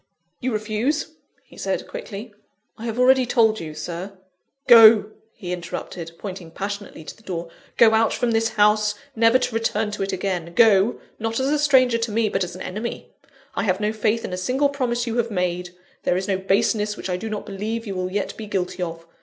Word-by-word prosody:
"You 255 - -2
refuse?" 220 +9 -1 0.3
he - - -18
said - - -2
quickly. 230 - -8 0.4
"I 225 - -8
have 230 0 -3
already 255 0 +4
told 220 -3 +3
you, 155 -2 -7
Sir 175 +5 -6 0.2
" 275 - -44
"Go!" 220 -3 +8 0.2
he 180 -2 -7
interrupted, 170 -1 -6
pointing 185 -4 -7
passionately 200 -1 -6
to - - -9
the - - -22
door, 170 -5 -5 0.3
"go 225 -1 +6
out 220 0 +3
from 245 -2 0
this 225 0 +2
house, 210 0 +4 0.2
never 230 +2 +5
to 250 -2 -2
return 225 -1 0
to 210 - -5
it 195 - -1
again 180 -3 -3
go, 220 -1 +5 0.2
not 225 +1 -2
as 265 +2 +1
a 300 - +2
stranger 255 -5 +4
to 230 -1 -2
me, 220 0 +1
but 195 - 0
as 180 0 -6
an 185 - -7
enemy! 215 +5 -5 0.4
I - - -1
have 185 -1 +1
no 210 +1 0
faith 220 +1 0
in - - -5
a - - -2
single 260 +10 +1
promise 245 -4 -1
you 235 0 -3
have 235 -1 +1
made: 180 -3 -2 0.3
there 180 - +1
is 190 - -3
no 190 -2 0
baseness 210 +2 +1
which - - -5
I 180 - -1
do 220 +5 -5
not 210 -1 -4
believe 215 +3 -4
you 200 - -4
will 185 0 -3
yet 205 +1 -2
be 220 - -8
guilty 185 -2 -2
of. 165 -1 -5
215 Hz, 210 wpm, -23 LUFS, 190-230 Hz, 0.4 s, Go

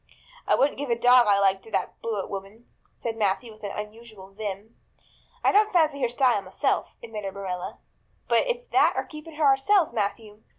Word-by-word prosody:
"I - - +4
wouldn't 275 0 +1
give 285 -2 -4
a 235 - +3
dog 245 0 +6
I 200 -1 +4
liked 195 -1 +3
to - - -15
that - - -2
Blewett 215 -4 -3
woman," 200 +4 -8 0.3
said 230 -2 -4
Matthew 215 +2 -1
with 215 - -20
unusual 210 -1 -8
vim. 205 +1 -6 0.7
"I - - +4
don't 425 +1 +4
fancy 310 -5 +2
her 245 - +2
style 245 -3 +2
myself," 195 +9 -2
admitted 210 -4 -6
Marilla, 185 -2 -5 0.5
"but - - +4
it's - - -2
that - - +4
or - - -1
keeping 305 0 -11
her 305 0 +1
ourselves, 285 +5 +3
Matthew. 210 0 -3
225 Hz, 180 wpm, -26 LUFS, 200-270 Hz, 0.7 s, dog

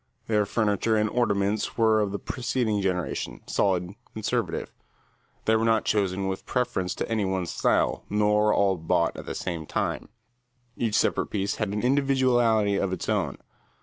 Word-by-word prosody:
Their 105 -2 +1
furniture 110 +1 +1
and 105 0 +2
ornaments 100 -3 0
were 110 -2 +4
of 100 -2 -1
the 100 - -2
preceding 115 -3 -1
generation, 90 -2 -2
solid, 90 -2 0 0.2
conservative. 110 -1 -2 0.7
They 110 - +4
were 110 - +2
not 115 -1 +2
chosen 95 -2 0
with 95 0 -3
reference 95 -8 0
to - - -3
any 110 -2 0
one 95 -1 -1
style, - - +1
nor 105 0 +3
all 100 -3 +2
bought 85 +1 +1
at - - -9
the - - -4
same 85 -4 -4
time. - - -2 0.7
Each 115 -3 -1
separate - - +2
piece 100 -1 -2
had 110 - -1
an 105 +2 -2
individuality 125 -6 +3
of 100 -1 0
its 95 - -4
own. - - 0
105 Hz, 160 wpm, -26 LUFS, 95-110 Hz, 0.7 s, were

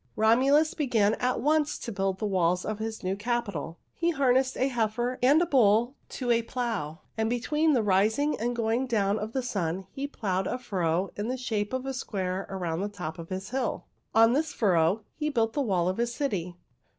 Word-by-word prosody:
"Romulus 265 +8 +4
began 230 -8 +2
at 250 +1 0
once 300 +1 +2
to 235 - -6
build 195 -2 -1
the 215 - -3
walls 180 -3 +1
of 215 -1 -3
his 220 -1 -5
new 185 +1 0
capital. 205 -7 -3 0.2
He 340 - 0
harnessed 260 -4 +2
a 260 - +2
heifer 240 0 -1
and 275 +5 +5
a - - +1
bull 240 -3 +3
to 245 -3 -2
a 235 0 +4
plow, 225 - -3 0.2
and 220 0 +1
between 300 +6 +1
the 240 -5 +2
rising 215 +9 +2
and 240 +2 -1
going 235 +3 0
down 210 -3 +1
of 215 +2 -5
the 265 - -1
sun 190 -5 -2
he 275 +1 -4
plowed 190 -8 -2
a - - -2
furrow 185 -6 -1
in 205 +2 -3
the 255 +2 -2
shape 215 -5 -2
of 260 0 -3
a 270 - -2
square 190 -6 -3
around 175 -3 -3
the 205 - -2
top 175 -6 -6
of 165 - -8
his 190 +2 -5
hill. 260 -2 -2 0.3
On 225 +1 +6
this 300 +3 0
furrow 185 0 +2
he 300 -1 -2
built 230 -5 +1
the 290 - 0
wall 185 -9 +1
of 185 - -1
his 235 0 0
city. 190 - -3
225 Hz, 205 wpm, -28 LUFS, 195-255 Hz, 0.3 s, On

